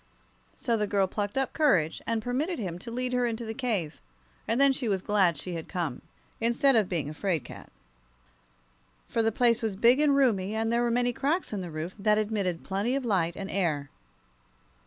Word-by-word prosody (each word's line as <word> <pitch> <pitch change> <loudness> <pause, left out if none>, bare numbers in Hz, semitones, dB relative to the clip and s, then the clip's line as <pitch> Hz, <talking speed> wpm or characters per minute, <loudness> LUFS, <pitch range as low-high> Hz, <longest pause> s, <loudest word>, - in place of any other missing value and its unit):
So 235 -5 0
the 210 -1 0
girl 200 -1 +2
plucked 205 +4 -3
up 270 -1 0
courage 185 - +2
and 225 -1 -1
permitted 290 +9 -1
him 180 -6 -4
to 230 - -8
lead 250 +2 -3
her 250 -1 +2
into 230 0 -3
the 220 - -4
cave; 220 - -2 0.5
and 230 +3 +1
then 275 -1 +5
she 255 -4 -1
was 195 -2 +1
glad 190 -6 +2
she 175 +4 -5
had 165 -1 -6
come, 170 -9 -3 0.4
instead 240 +4 +3
of 215 -5 +3
being 165 -6 -1
a 150 - -5
'fraid 170 -2 -1
cat. - - -11 1.4
For 230 - 0
the 225 0 +2
place 235 0 +3
was 220 -4 -2
big 235 +7 +4
and 295 -2 +4
roomy, 215 -7 +2
and 225 +1 0
there 235 - +2
were 240 - +1
many 245 +1 +1
cracks 290 +3 -1
in 200 - -2
the 180 - -6
roof, 160 +3 -5
that 210 +1 +3
admitted 205 -5 -1
plenty 205 +7 -1
of 275 -2 -2
light 175 -6 +1
and 195 0 -6
air. 155 -7 -1
220 Hz, 205 wpm, -28 LUFS, 185-245 Hz, 1.4 s, then